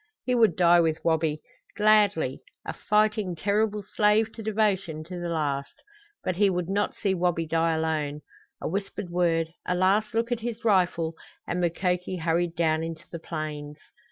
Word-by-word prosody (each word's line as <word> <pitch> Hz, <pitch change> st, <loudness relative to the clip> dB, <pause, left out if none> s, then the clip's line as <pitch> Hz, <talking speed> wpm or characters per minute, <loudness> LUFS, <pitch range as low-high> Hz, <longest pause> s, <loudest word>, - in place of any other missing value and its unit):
He 250 Hz, -, +1 dB
would 230 Hz, -3 st, +4 dB
die 175 Hz, -1 st, +5 dB
with 160 Hz, -2 st, +2 dB
Wabi, 160 Hz, -2 st, +1 dB, 0.3 s
gladly 205 Hz, -10 st, +3 dB, 0.2 s
a -, -, -4 dB
fighting, 210 Hz, -3 st, +1 dB
terrible 210 Hz, +3 st, 0 dB
slave 210 Hz, +3 st, +2 dB
to 225 Hz, -, -8 dB
devotion 200 Hz, -7 st, 0 dB
to 180 Hz, +2 st, -7 dB
the 175 Hz, 0 st, -3 dB
last; 145 Hz, -4 st, -2 dB, 0.5 s
but 185 Hz, -, -2 dB
he 205 Hz, 0 st, +4 dB
would 180 Hz, -2 st, -1 dB
not 205 Hz, +1 st, 0 dB
see 195 Hz, -2 st, 0 dB
Wabi 175 Hz, -2 st, 0 dB
die 165 Hz, 0 st, +1 dB
alone. 155 Hz, -2 st, -1 dB, 0.4 s
A -, -, -4 dB
whispered 195 Hz, 0 st, -4 dB
word, 165 Hz, -2 st, +1 dB
a 180 Hz, -, -1 dB
last 200 Hz, +5 st, +2 dB
look 230 Hz, +1 st, 0 dB
at 240 Hz, -, 0 dB
his 235 Hz, 0 st, -5 dB
rifle, 180 Hz, -5 st, +2 dB, 0.3 s
and 175 Hz, +1 st, -2 dB
Mukoki 180 Hz, +1 st, -1 dB
hurried 170 Hz, +1 st, 0 dB
down 160 Hz, -1 st, +1 dB
into 165 Hz, +1 st, -6 dB
the 170 Hz, -, -6 dB
plains. 150 Hz, -2 st, -5 dB
175 Hz, 165 wpm, -26 LUFS, 160-205 Hz, 0.5 s, die